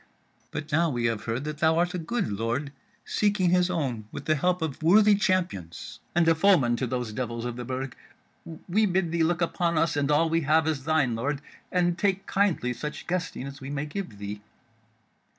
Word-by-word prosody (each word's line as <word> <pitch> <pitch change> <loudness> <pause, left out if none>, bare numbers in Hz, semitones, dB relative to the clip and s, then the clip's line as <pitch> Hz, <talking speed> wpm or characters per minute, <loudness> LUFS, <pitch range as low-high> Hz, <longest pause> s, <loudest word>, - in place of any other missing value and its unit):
But 155 +1 -6
now 165 +2 +3
we 120 -4 -1
have 115 -1 -1
heard 115 +4 -2
that 150 0 -5
thou 160 +1 +3
art 175 +1 +1
a 180 - -2
good 205 +7 -1
lord 115 +7 -2 0.3
seeking 205 -4 +1
his 180 0 +3
own 130 -11 -2
with 145 - -7
the 155 - +3
help 180 +3 +1
of 155 -2 -4
worthy 205 +6 +6
champions, 180 - -1 0.2
and 170 -1 +4
a 165 - +6
foeman 160 -9 +4
to 130 - -1
those 120 -3 -3
devils 115 -1 -3
of 120 -1 -3
the 125 - -5
Burg, 130 +1 -4 0.7
we 210 +4 +3
bid 180 -2 0
thee 170 0 0
look 170 +1 +2
upon 170 0 0
us 165 0 +2
and 145 -1 0
all 150 +3 +4
we 165 +1 +1
have 155 +2 +3
as 150 -4 -1
thine, 155 -6 +2
lord, 135 +5 -1 0.3
and 175 -1 +1
take 195 -1 +1
kindly 190 -11 +1
such 150 +5 -6
guesting 180 -6 -3
as 140 0 -9
we 135 - -6
may 145 +1 -2
give 150 - -6
thee." 100 +1 -6
155 Hz, 205 wpm, -27 LUFS, 125-175 Hz, 0.7 s, worthy